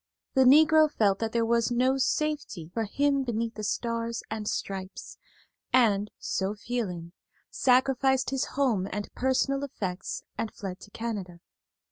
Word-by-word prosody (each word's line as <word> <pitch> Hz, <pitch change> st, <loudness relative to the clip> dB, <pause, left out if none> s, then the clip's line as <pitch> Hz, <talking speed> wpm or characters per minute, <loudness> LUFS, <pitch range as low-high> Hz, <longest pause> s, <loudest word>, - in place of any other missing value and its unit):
The 265 Hz, -1 st, +5 dB
Negro 310 Hz, +3 st, +6 dB
felt 200 Hz, -7 st, +2 dB
that 225 Hz, -1 st, -2 dB
there 230 Hz, 0 st, +1 dB
was 235 Hz, 0 st, +2 dB
no 255 Hz, +2 st, +2 dB
safety 270 Hz, -, -1 dB
for 225 Hz, -1 st, -1 dB
him 280 Hz, +6 st, +1 dB
beneath 230 Hz, -2 st, -2 dB
the 215 Hz, -, -7 dB
Stars 230 Hz, +1 st, -2 dB
and 215 Hz, -1 st, -4 dB
Stripes, 190 Hz, -2 st, -5 dB, 0.5 s
and, 210 Hz, -5 st, +3 dB
so 195 Hz, +2 st, -2 dB
feeling, 205 Hz, -7 st, -4 dB, 0.4 s
sacrificed 265 Hz, 0 st, +2 dB
his 270 Hz, -1 st, 0 dB
home 230 Hz, -9 st, +2 dB
and 205 Hz, +1 st, -5 dB
personal 270 Hz, +2 st, +1 dB
effects 195 Hz, -9 st, -4 dB, 0.2 s
and 225 Hz, -, -2 dB
fled 190 Hz, -2 st, -7 dB
to -, -, -13 dB
Canada. 205 Hz, -6 st, -5 dB
230 Hz, 140 wpm, -28 LUFS, 205-265 Hz, 0.5 s, Negro